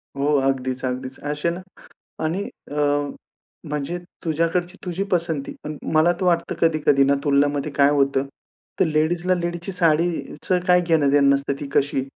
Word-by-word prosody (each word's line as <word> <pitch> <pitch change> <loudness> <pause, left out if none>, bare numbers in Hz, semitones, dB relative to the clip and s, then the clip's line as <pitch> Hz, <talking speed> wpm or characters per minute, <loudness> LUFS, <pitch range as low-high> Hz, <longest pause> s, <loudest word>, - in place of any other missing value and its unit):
हो, 145 +2 +1
अगदीच, 130 -1 -2
अगदीच. 130 +1 -4
असे 150 +3 -2
ना 175 +2 -6 0.6
आणि 175 +6 -1 0.3
अ, 150 - -1 0.9
म्हणजे 150 +4 -3 0.3
तुझ्याकडची 170 +3 0
तुझी 180 +2 -2
पसंती, 165 -5 -1
पण 150 0 -5 0.2
मला 160 +3 +4
तर - - 0
वाटतं 170 -2 +1
कधी-कधी 155 -4 +3
ना 140 - +3
तुलनामध्ये 145 0 +2
काय 140 0 +4
होतं, 140 -1 +2 0.5
तर - - +6
लेडीजला 165 +4 +1
लेडीजची 175 +2 -4
साडीचं 170 0 0
काय 180 -1 +5
घेणं-देणं 145 -5 +3
नसतं 140 0 +1
ती 145 - -5
कशी, 140 -1 +2
155 Hz, 145 wpm, -22 LUFS, 140-170 Hz, 0.9 s, तर